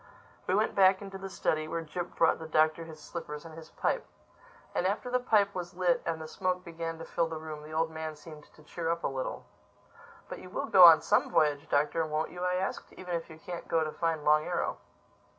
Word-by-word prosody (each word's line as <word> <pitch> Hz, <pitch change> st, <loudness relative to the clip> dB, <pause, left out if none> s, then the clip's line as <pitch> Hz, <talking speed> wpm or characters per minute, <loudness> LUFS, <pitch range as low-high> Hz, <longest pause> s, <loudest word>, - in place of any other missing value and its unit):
We 185 Hz, -, +2 dB
went 215 Hz, +2 st, +1 dB
back 190 Hz, 0 st, +4 dB
into 195 Hz, -1 st, -8 dB
the 195 Hz, 0 st, -6 dB
study, 155 Hz, -3 st, -1 dB
where 165 Hz, +1 st, -3 dB
Jip 175 Hz, +2 st, -6 dB
brought 165 Hz, -, +3 dB
the 160 Hz, -, -7 dB
Doctor 155 Hz, +1 st, +2 dB
his 160 Hz, -1 st, -11 dB
slippers 150 Hz, -1 st, -7 dB
and 165 Hz, -, -10 dB
his 160 Hz, 0 st, -11 dB
pipe. -, -, -1 dB, 0.7 s
And 180 Hz, -, +1 dB
after 215 Hz, +5 st, -2 dB
the 250 Hz, -, +2 dB
pipe 210 Hz, -5 st, +2 dB
was 175 Hz, -1 st, -6 dB
lit 180 Hz, -1 st, +2 dB
and 165 Hz, -1 st, -1 dB
the 160 Hz, -, -7 dB
smoke 180 Hz, +2 st, -2 dB
began 165 Hz, -1 st, -5 dB
to 165 Hz, -, -8 dB
fill 170 Hz, -1 st, 0 dB
the 165 Hz, -1 st, -5 dB
room 155 Hz, -1 st, -7 dB
the 150 Hz, +1 st, -11 dB
old 160 Hz, +1 st, 0 dB
man 160 Hz, -1 st, -5 dB
seemed 150 Hz, 0 st, -12 dB
to 155 Hz, -, -18 dB
cheer 165 Hz, +2 st, -4 dB
up 170 Hz, 0 st, -1 dB
a -, -, +2 dB
little. 130 Hz, -1 st, -4 dB, 0.8 s
"But -, -, -7 dB
you 185 Hz, -, -11 dB
will -, -, -3 dB
go 185 Hz, -2 st, +8 dB
on 165 Hz, -2 st, +9 dB
some -, -, +2 dB
voyage, 150 Hz, 0 st, +1 dB
Doctor, 150 Hz, +3 st, +2 dB
won't 155 Hz, 0 st, -2 dB
you?" 180 Hz, 0 st, -6 dB
I 180 Hz, 0 st, +1 dB
asked—"even 185 Hz, -1 st, -4 dB
if 165 Hz, 0 st, -4 dB
you 160 Hz, -, -11 dB
can't 175 Hz, +1 st, -7 dB
go 165 Hz, -1 st, +2 dB
to 155 Hz, -, -3 dB
find 165 Hz, -2 st, -2 dB
Long 150 Hz, 0 st, +5 dB
Arrow." -, -, -2 dB
165 Hz, 230 wpm, -30 LUFS, 155-180 Hz, 0.8 s, on